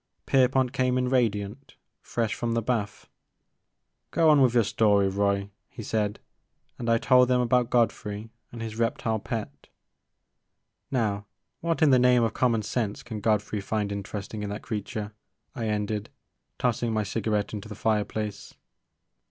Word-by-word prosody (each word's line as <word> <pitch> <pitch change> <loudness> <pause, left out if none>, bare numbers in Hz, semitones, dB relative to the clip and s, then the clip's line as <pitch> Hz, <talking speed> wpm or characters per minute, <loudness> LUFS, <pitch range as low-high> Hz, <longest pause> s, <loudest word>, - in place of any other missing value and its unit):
Pierpont 130 -1 +3
came 125 0 +1
in 125 0 +1
radiant, 115 0 -1 0.3
fresh 115 -2 -1
from 120 -1 -2
the 115 - +1
bath. 110 -3 -2 1.0
Go 165 -1 +4
on 145 -2 +5
with 125 -2 +4
your 120 - +5
story, 100 -1 +3
Roy,'* 100 0 0 0.2
he 115 - -9
said; 105 -1 -1 0.6
and 120 -2 -2
I 115 - +5
told 125 +1 +5
them 125 0 +3
about 125 0 +2
Godfrey 110 -2 0 0.2
and 115 -1 -6
his 110 0 -6
reptile 115 -1 0
pet. 110 +1 -6 0.6
*' - - -54
Now 105 -6 -1 0.3
what 165 -1 0
in 150 - +6
the 130 - +6
name 125 -1 +5
of 115 -2 0
common 115 -4 +1
sense 105 +2 -2
can 115 -3 -6
Godfrey 105 -1 0
find 105 0 -2
interesting 100 +1 -5
in 105 - -3
that 105 +1 -5
creature? 105 0 -4 0.4
I 115 -6 -3
ended, 105 0 -2 0.5
tossing 120 -1 0
my 110 -1 +1
cigarette 105 0 -1
into 105 0 -6
the 105 - -7
fireplace. 105 0 -2
110 Hz, 155 wpm, -27 LUFS, 105-125 Hz, 1.0 s, in